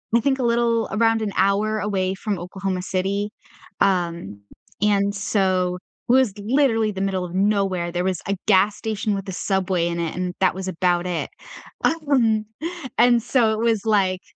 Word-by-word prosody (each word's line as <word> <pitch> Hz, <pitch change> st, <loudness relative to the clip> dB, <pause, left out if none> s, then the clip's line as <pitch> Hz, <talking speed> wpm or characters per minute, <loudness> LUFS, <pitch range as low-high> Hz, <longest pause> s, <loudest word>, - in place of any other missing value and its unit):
I -, -, +6 dB
think, 265 Hz, +3 st, 0 dB
a -, -, 0 dB
little 235 Hz, -1 st, +1 dB
around 225 Hz, +2 st, +2 dB
an 210 Hz, -, -2 dB
hour 205 Hz, +3 st, +2 dB
away 195 Hz, -2 st, -1 dB
from 200 Hz, -1 st, -3 dB
Oklahoma 190 Hz, +1 st, -4 dB
City, 195 Hz, +2 st, -1 dB, 0.5 s
um, 170 Hz, -, 0 dB, 0.4 s
and 200 Hz, -1 st, +2 dB
so, 185 Hz, -3 st, 0 dB, 0.3 s
was 255 Hz, -4 st, +4 dB
literally 225 Hz, -1 st, +2 dB
the 190 Hz, -1 st, -5 dB
middle 190 Hz, -2 st, -1 dB
of 180 Hz, 0 st, -6 dB
nowhere. 195 Hz, -3 st, +1 dB
There 175 Hz, +1 st, -1 dB
was 185 Hz, -3 st, -1 dB
a 200 Hz, -, 0 dB
gas 200 Hz, 0 st, +4 dB
station 215 Hz, -1 st, -2 dB
with 195 Hz, -1 st, -4 dB
a -, -, -3 dB
Subway 185 Hz, -2 st, 0 dB
in 170 Hz, 0 st, -3 dB
it, 165 Hz, -2 st, -3 dB
and 180 Hz, 0 st, -3 dB
that 185 Hz, -1 st, +2 dB
was 190 Hz, 0 st, -5 dB
about 180 Hz, 0 st, 0 dB
it. 175 Hz, -3 st, -2 dB, 0.5 s
Um, 260 Hz, -9 st, +2 dB, 0.5 s
and 240 Hz, 0 st, +5 dB
so, 230 Hz, -1 st, +2 dB
it 215 Hz, -, -2 dB
was 225 Hz, -2 st, +1 dB
like, 190 Hz, -4 st, +2 dB
195 Hz, 170 wpm, -22 LUFS, 185-220 Hz, 0.5 s, I